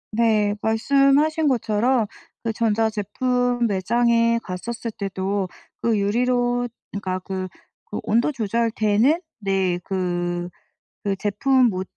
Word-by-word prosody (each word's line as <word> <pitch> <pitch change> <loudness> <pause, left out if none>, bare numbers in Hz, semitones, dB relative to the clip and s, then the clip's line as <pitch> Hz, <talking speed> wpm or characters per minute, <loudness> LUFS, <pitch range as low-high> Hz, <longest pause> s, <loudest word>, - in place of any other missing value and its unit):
네. 215 -2 +2
말씀하신 275 +7 +3
것처럼 235 -1 +2 0.4
그 230 - 0
전자 225 -1 +1
제품 245 +3 0
매장에 230 +3 +2
갔었을 230 +6 -5
때도 195 -1 -2 0.3
그 230 -2 +2
유리로 245 +4 +1 0.2
그러니까 190 -2 -3
그 185 0 -4 0.5
오 - - -1
온도 235 +7 +2
조절되는 230 - +1 0.2
네 190 -3 0
그 175 -2 -2 0.6
그 200 -1 +1
제품 245 +6 +3
모 185 -2 -2
220 Hz, 215 characters per minute, -23 LUFS, 195-245 Hz, 0.6 s, 말씀하신